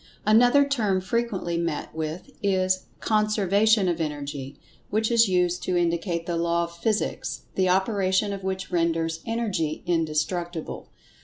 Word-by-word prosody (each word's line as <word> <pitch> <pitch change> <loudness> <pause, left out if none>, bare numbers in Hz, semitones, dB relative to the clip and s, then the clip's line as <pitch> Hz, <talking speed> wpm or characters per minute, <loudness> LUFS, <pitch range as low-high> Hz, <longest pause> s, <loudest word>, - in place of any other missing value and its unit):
Another 245 +6 +5
term 215 -9 +1
frequently 190 -4 -1
met 170 -3 -3
with, 160 +2 -5
is 185 -1 +1 0.2
"Conservation 215 -1 +3
of 170 -2 0
Energy," 145 -2 -5 0.3
which 220 +2 0
is 230 -3 +5
used 180 -1 +1
to 180 -1 0
indicate 170 0 0
that 170 -1 -2
Law 170 0 +1
of 170 0 -7
Physics 215 +5 -2
the 185 -1 +1
operation 190 +1 +1
of 195 - -6
which 190 0 -3
renders 165 -1 0
Energy 205 -10 -1
indestructible. 170 0 -2
185 Hz, 135 wpm, -25 LUFS, 170-210 Hz, 0.3 s, Another